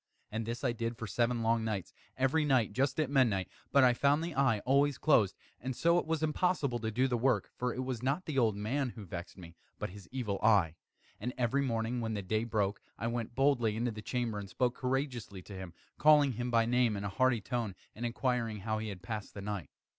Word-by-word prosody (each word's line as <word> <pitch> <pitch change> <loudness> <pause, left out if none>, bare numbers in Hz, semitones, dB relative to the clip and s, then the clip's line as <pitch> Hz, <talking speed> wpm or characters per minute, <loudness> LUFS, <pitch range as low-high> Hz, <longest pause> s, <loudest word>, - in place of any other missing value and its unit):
And 110 +1 -3
this 120 +2 -4
I 125 - +2
did 115 0 -3
for 115 - -5
seven 115 +3 0
long 115 0 +2
nights 105 -4 -3 0.2
every 135 +5 +2
night 130 -8 +2
just 135 +4 +1
at 155 - +2
midnight 120 -9 +2 0.2
but 140 0 +6
I 125 -1 +6
found 145 +5 +2
the 170 0 -3
eye 135 -5 +3
always 140 +3 +3
closed; 110 -11 +3 0.2
and 130 +1 -4
so 170 +5 +4
it - - -5
was 160 -1 0
impossible 150 -5 +1
to 110 -1 -2
do 125 +4 +2
the 120 -2 0
work; 130 +2 +1
for 125 0 -1
it 130 - -3
was 130 -3 -3
not 140 +8 0
the 150 -5 0
old 110 -4 +3
man 125 +7 -1
who 110 -4 -8
vexed 85 +1 -7
me, 85 -2 -11 0.2
but - - -4
his 100 -2 -12
Evil 115 -7 -2
Eye. 100 -7 +4 0.5
And 125 +4 -3
every 125 +3 +1
morning, 120 -2 -1
when 110 -1 -2
the 100 - -3
day 110 +4 0
broke, 105 -3 0 0.2
I 115 - -4
went 115 0 -3
boldly 130 -6 +3
into 120 +2 0
the 105 -1 -7
chamber, 115 -1 -2
and 100 -1 -7
spoke 125 +4 +1
courageously 125 -8 -3
to 100 - -10
him, 95 -2 -7 0.3
calling 150 -2 +6
him 120 +1 -3
by 115 -1 +3
name 120 -2 +2
in 100 - -4
a 100 - -2
hearty 130 +4 +2
tone, 115 -3 -3 0.2
and 115 - -7
inquiring 120 -3 -1
how 110 +1 -1
he 110 0 -4
has 100 - -6
passed 105 -1 -5
the 100 - -6
night. 100 -5 -4
120 Hz, 230 wpm, -32 LUFS, 105-130 Hz, 0.5 s, but